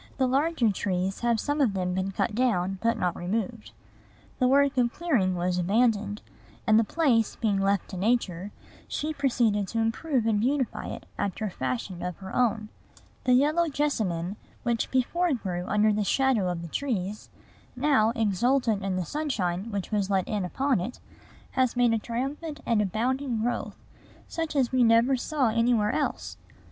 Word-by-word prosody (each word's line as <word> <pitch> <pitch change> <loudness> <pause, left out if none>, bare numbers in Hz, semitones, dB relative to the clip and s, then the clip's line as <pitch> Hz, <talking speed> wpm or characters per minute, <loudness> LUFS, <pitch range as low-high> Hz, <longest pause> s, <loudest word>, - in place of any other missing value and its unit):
The 265 - +2
larger 270 -2 +2
trees 190 0 -2
have 235 -1 +1
some 290 +4 -1
of 240 -7 +3
them 180 -1 -1
been 190 +1 -1
cut 210 - -1
down, 195 -6 0
but 230 +1 +1
not 180 -1 0
removed. 215 +4 -3 0.7
The 255 - +4
work 280 +1 +4
of 245 -2 +2
clearing 235 - +1
was 180 +1 0
abandoned; 210 +2 +1 0.4
and, 220 0 +5
the - - +4
place 235 -4 +1
being 205 -4 0
left 195 -1 +1
to 190 - -5
Nature, 195 -3 0 0.4
she 310 +1 -3
proceeded 235 -8 +1
to 230 - -5
improve 230 +3 0
and 220 -2 +2
beautify 260 +2 -1
it - - -7
after 205 +2 -2
a 205 - -3
fashion 130 +7 -3
of 180 -1 -4
her 190 -1 -8
own. 225 -3 +1 0.6
The 250 - +4
yellow 305 +6 +3
jessamine, 210 - -1 0.3
which 235 -2 0
before 340 +7 +1
grew 180 -6 -4
under 210 +1 +3
the 210 0 0
shadow 240 -4 +2
of 170 -1 -3
the - - -6
trees, 210 - -3 0.5
now, 255 -5 +3
exultant 225 0 +1
in 195 -1 -1
the 185 -1 -1
sunshine 205 - -2
which 200 -3 -4
was 205 -2 0
let 190 -2 +1
in 210 -3 -1
upon 260 +6 0
it, 190 +8 -5 0.5
has 255 -2 +1
made 240 -2 +4
a 225 - +1
triumphant 275 +7 -4
and 230 -3 +2
abounding 235 +4 -1
growth, 245 - -2 0.5
such 325 -2 -4
as 260 -4 +2
we 255 -1 +3
never 230 +3 +5
saw 265 -1 0
anywhere 230 -2 +2
else. 290 - -2
225 Hz, 170 wpm, -27 LUFS, 195-260 Hz, 0.7 s, and